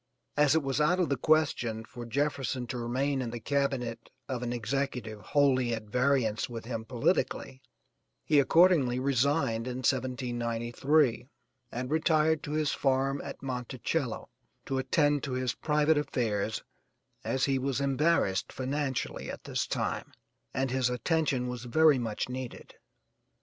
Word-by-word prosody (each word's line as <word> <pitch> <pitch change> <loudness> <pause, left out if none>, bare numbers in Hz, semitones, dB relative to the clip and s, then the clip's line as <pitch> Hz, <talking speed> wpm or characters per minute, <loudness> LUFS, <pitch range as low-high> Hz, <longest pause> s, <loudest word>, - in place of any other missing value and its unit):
As 150 0 +4
it 160 - +2
was 135 +2 0
out 175 +5 +3
of 180 - +1
the 140 - +2
question 125 -6 +1
for 120 0 -9
Jefferson 135 -1 -1
to 125 - -5
remain 130 +4 0
in 120 - -3
the 120 +1 -5
cabinet 125 -3 -1 0.2
of 130 -3 -3
an 120 -1 -2
executive 120 -2 -2
wholly 130 -3 +2
at 110 - -6
variance 125 0 +1
with 115 -2 -7
him 115 -2 -4
politically, 130 +1 -1 0.6
he 150 -2 +4
accordingly 145 -5 +4
resigned 130 -3 +1
in 125 0 -3
1793 125 +1 +1 0.4
and 125 +3 -4
retired 160 0 +3
to 150 - -5
his 155 -1 +1
farm 135 0 +1
at - - -8
'Monticello' 130 +1 -3 0.4
to 135 -1 -1
attend 145 +1 +2
to 135 - -4
his 125 -1 -1
private 150 0 +2
affairs 110 -7 -1 0.6
as 130 -1 +1
he 135 -1 +1
was 135 0 -1
embarrassed 140 - +1
financially 135 0 -3
at - - -7
this - - -2
time, - - -3 0.4
and 130 -1 -1
his 130 -1 +1
attention 130 0 0
was 125 -1 -5
very 150 +2 +5
much 115 -3 -2
needed. 125 -1 -7
130 Hz, 145 wpm, -30 LUFS, 120-145 Hz, 0.6 s, very